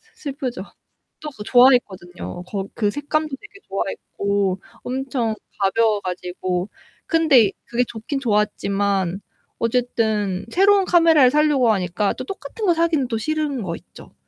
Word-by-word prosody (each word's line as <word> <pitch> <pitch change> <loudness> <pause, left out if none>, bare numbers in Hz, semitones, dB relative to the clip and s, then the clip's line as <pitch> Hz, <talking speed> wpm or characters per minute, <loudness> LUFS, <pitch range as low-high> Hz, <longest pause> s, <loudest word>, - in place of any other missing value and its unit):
슬프죠. 265 -8 -5 0.6
또 305 - -6
그거 240 -7 -10
좋아했거든요. 205 -9 +2 0.3
그 210 -2 +1
색감도 300 +5 -1
되게 415 -1 -15
좋아했고 195 0 -2 0.2
엄청 255 -3 -2 0.2
가벼워 210 +2 +2
가지고. 180 0 -3 0.4
근데 295 - +4
그게 240 +1 0
좋긴 235 +6 -5
좋았지만 200 -4 0 0.4
어쨌든 220 -5 0
새로운 395 +1 +4
카메라를 330 -7 +5
살려고 295 -4 +3
하니까 190 0 0
또 - - -6
똑같은 390 +2 -7
거 360 - +4
사기는 325 -5 +1
또 225 -2 -1
싫은 300 0 -2
거 170 -4 -3
있죠. - - -16
235 Hz, 295 characters per minute, -21 LUFS, 200-295 Hz, 0.6 s, 카메라를